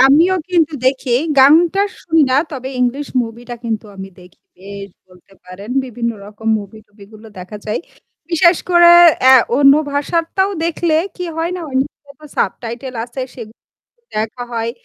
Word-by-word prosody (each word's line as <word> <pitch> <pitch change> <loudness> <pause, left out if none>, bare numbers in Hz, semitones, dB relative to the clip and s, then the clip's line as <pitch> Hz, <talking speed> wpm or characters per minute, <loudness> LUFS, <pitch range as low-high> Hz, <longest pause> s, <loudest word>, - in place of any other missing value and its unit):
আমিও 305 +8 +5 0.2
কিন্তু 330 -3 +2
দেখি 260 -1 0 0.3
গানটা 325 +8 +5 0.2
শুনি 325 -2 +2
না 260 - +3
তবে 265 -3 -6
ইংলিশ 260 +4 -1
মুভিটা 235 +1 -8
কিন্তু 220 -1 -3
আমি 190 0 -8
দেখি। 180 +1 -19 0.2
বেশ 200 +1 -9 0.2
বলতে 180 +1 -22
পারেন 190 +5 -11
বিভিন্ন 240 -1 -3 0.2
রকম 215 +2 -7
মুভি-টুভিগুলো 210 +1 -14
দেখা 185 +4 -9
যায়। 215 - -2 0.5
বিশেষ 340 +1 +4
করে 345 0 +7 0.3
অ্যা 260 +1 +7 0.2
অন্য 275 0 +6 0.2
ভাষারটাও 335 +6 -1
দেখলে 335 -1 0 0.2
কি 360 - -5
হয় 330 +1 -2
না? - - -6
ওই 260 - -9
নিচে 280 +1 -7
তো 305 - -12
সাবটাইটেল 245 +2 -3
আছে, 245 +2 -8
সেগুলো 225 -2 -11 0.6
দেখা 220 +3 -3
হয়। 230 0 -2
255 Hz, 150 wpm, -16 LUFS, 215-310 Hz, 0.6 s, করে